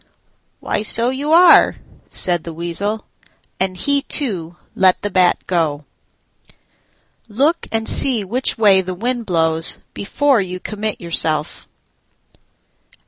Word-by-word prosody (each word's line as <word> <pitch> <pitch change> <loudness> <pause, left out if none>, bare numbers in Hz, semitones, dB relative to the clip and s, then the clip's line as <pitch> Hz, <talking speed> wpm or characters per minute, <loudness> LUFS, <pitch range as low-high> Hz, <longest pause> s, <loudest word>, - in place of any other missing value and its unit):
"Why, - - -3
so 230 +3 +4
you 285 +3 -4
are," 345 +1 +6 0.3
said 175 -3 0
the 165 - -8
Weasel; 200 +6 -4 0.5
and 185 -1 -1
he 280 +7 0
too 185 - -2 0.2
let 185 -1 +2
the 205 - -3
Bat 180 -1 +2
go. 155 -5 -2 1.4
Look 280 +10 -1
and 225 0 -1
see 245 -6 +5
which 245 +7 -3
way 200 -4 +4
the 185 0 -6
wind 235 +3 -3
blows 165 -2 0 0.2
before 270 +3 0
you 185 -1 -6
commit 215 +2 -5
yourself. 160 -3 -1
200 Hz, 120 wpm, -17 LUFS, 175-240 Hz, 1.4 s, are